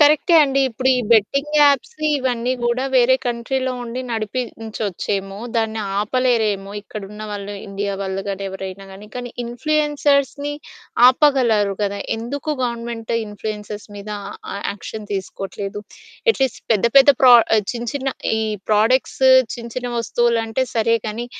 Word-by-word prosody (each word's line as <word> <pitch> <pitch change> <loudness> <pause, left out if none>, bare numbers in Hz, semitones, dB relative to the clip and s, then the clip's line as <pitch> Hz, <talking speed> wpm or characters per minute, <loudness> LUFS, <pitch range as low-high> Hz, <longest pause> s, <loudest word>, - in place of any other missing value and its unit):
కరె‌క్టే 305 +4 +5
అండి. 275 -1 +2
ఇప్పుడు 255 +2 -1
ఈ - - +1
బెట్టింగ్ 275 +8 +2
యాప్స్ 290 - +3 0.2
ఇవన్నీ 250 -1 -1
గూడా 240 +2 0
వేరే 255 +1 +5
కంట్రీ‌లో 255 +2 -1
ఉండి 240 +2 -5
నడిపించొచ్చేమో, 215 -4 -3 0.2
దాన్ని 220 -1 0 0.2
ఆపలేరేమో 215 -3 +1
ఇక్కడున్న 210 0 -8
వాళ్ళు 205 0 -5
ఇండియా 200 0 -3
వాళ్ళు 190 0 -3
గాని 195 0 -3
ఎవరైనా 190 0 -7
గాని. 205 +2 -11
కానీ 245 -1 -5
ఇన్‌ఫ్లుయెన్సర్స్‌ని 290 +1 0 0.6
ఆపగలరు 245 -7 +3
కదా! 200 0 -1 0.2
ఎందుకు 275 +7 -4
గవర్నమెంట్ 235 -1 -4
ఇన్‌ఫ్లుయెన్సర్స్‌ 210 0 -6
మీద 205 +1 -8 0.2
ఆ, - - -7 0.2
ఆ - - -4 0.2
యాక్షన్ 205 +3 -7
తీసుకోవట్లేదు? 195 +1 -5 0.5
ఎట్లీస్ట్ 265 - -1
పెద్ద 215 0 +1
పెద్ద 275 +1 +8
ప్రో 255 -2 +8 0.2
ఆ - - +5
చిన్న 235 -1 -5
చిన్న 275 -1 -2 0.3
ఈ - - 0 0.3
ప్రాడక్ట్స్ 225 +6 +2 0.3
చిన్న 235 -1 -8
చిన్న 250 -1 -2
వస్తువులు 235 0 +1
అంటే 225 +4 -1
సరే 230 0 +3
గానీ. 230 +3 -4
230 Hz, 135 wpm, -20 LUFS, 205-260 Hz, 0.6 s, పెద్ద